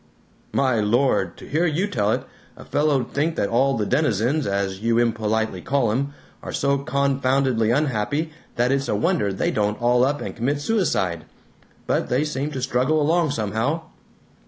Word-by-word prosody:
"My 130 -4 +2
Lord, 105 -4 +1
to - - -11
hear 165 +4 +1
you 165 +5 0
tell 110 - 0
it, - - 0 0.3
a - - -11
fellow 145 -3 +1
'd 120 - -12
think 160 +3 0
that 100 - 0
all 130 +2 +2
the 105 - 0
denizens, 135 +2 +1
as 100 -1 -1
you 115 +2 +1
impolitely 110 -4 0
call 135 -2 +1
'em, 140 +5 -2 0.3
are - - -6
so 140 0 +1
confoundedly 135 -3 +1
unhappy 145 +3 0 0.2
that 120 +2 +2
it's 140 0 0
a - - 0
wonder 165 - +1
they 95 - -1
don't 105 0 0
all 120 +1 +3
up 145 +2 +1
and - - -6
commit 140 +5 -1
suicide. 145 - 0 0.6
But - - 0
they 130 +4 +2
seem 150 -1 -2
to 130 - -4
struggle 135 +4 +1
along 160 +2 +2
somehow!" 115 +6 -1
130 Hz, 175 wpm, -23 LUFS, 110-145 Hz, 0.6 s, all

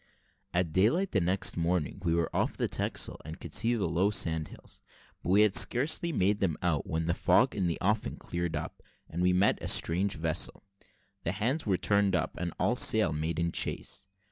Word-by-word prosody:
At 90 -2 0
daylight 120 - +2
the 95 - +2
next 90 +3 +1
morning 85 +1 -1
we 85 -2 +1
were 85 -1 -1
off - - -1
the - - 0
Texel, - - -2
and 80 +4 -9
could - - -8
see 115 +3 +2
the 110 - -1
low 85 +5 +1
sand 80 -6 0
hills: - - -12 0.4
but - - -5
we 100 +3 +5
had 105 -2 +2
scarcely 155 +7 +3
made 105 - +1
them 85 -6 0
out, 80 -5 0
when 80 0 -2
the 85 - +1
fog - - +2
in 95 -4 -1
the 85 - -1
offing 105 +3 0
cleared 85 -1 -4
up, 75 +1 -6 0.3
and 85 - -5
we 90 0 +3
made 90 +2 +2
a - - -4
strange 95 +4 +2
vessel. 80 +5 -1 0.6
The 85 0 -2
hands 120 +8 -1
were 95 -2 +2
turned 100 -1 +2
up, 80 - -2
and 85 -1 -3
all 120 - +1
sail 110 -9 +3
made 80 +2 -2
in 85 0 0
chase. - - -2
90 Hz, 205 wpm, -29 LUFS, 85-105 Hz, 0.6 s, we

